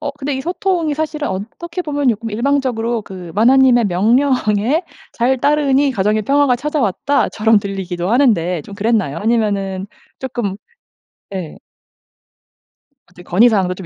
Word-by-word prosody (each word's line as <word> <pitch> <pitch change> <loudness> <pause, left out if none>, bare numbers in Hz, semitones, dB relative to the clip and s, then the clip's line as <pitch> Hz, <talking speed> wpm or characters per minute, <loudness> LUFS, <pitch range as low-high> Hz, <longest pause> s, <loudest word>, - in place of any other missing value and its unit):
어 295 -2 -3
근데 285 -1 -4
이 - - -3
소통이 345 -1 -1
사실은 305 -1 -3
어떻게 335 - -5
보면 290 -4 -1
쪼끔 225 0 -1
일방적으로 240 -2 -1
그 180 -4 -9
'마나님의 245 +1 +5
명령에 230 - +1 0.3
잘 255 +3 +1
따르니 285 0 +2
가정의 210 0 0
평화가 275 +1 +2
찾아왔다.' 280 -1 0
처럼 220 0 +3
들리기도 190 -2 -4
하는데 180 - +2
좀 200 - -11
그랬나요? 200 -8 0
아니면은 200 -3 -1 0.3
쪼끔 240 -7 -4 0.8
예. 180 -5 -6 1.5
어떻게 180 0 -15
건의사항도 190 -1 +3
좀 185 -1 -9
230 Hz, 320 characters per minute, -17 LUFS, 195-280 Hz, 1.5 s, 마나님의